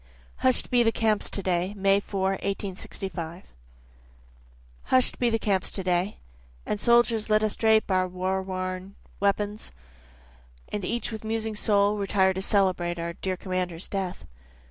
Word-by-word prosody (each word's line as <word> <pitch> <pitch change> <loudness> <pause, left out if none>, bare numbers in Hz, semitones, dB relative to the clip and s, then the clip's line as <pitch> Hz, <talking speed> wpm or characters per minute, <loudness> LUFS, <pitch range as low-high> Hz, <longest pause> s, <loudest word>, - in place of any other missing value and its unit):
Hush'd 255 0 +2
Be 245 -1 +5
the 225 -1 +4
Camps 220 -2 +1
To 200 - -1
Day 180 +2 0
[May 195 0 +4
4, 195 -1 -1
1865 190 -3 -5 1.3
Hush'd 255 -1 +2
be 245 - +3
the 225 - +2
camps 200 -4 0
to 190 - -4
day, 180 +2 0 0.5
And 210 - -2
soldiers 235 -2 +3
let 215 0 +4
us 215 - +1
drape 220 -2 +3
our 185 0 +3
war 185 +1 -1
worn 185 +1 -4 0.2
weapons, 205 - 0 1.0
And 210 - -3
each 235 +6 -2
with 220 -1 -6
musing 220 0 -2
soul 205 0 +2
retire 190 -1 +2
to 190 - -3
celebrate, 185 -4 +1
Our 170 0 -3
dear 185 +1 -3
commander's 180 -2 -3
death. 190 -3 -4
195 Hz, 145 wpm, -27 LUFS, 185-215 Hz, 1.3 s, Be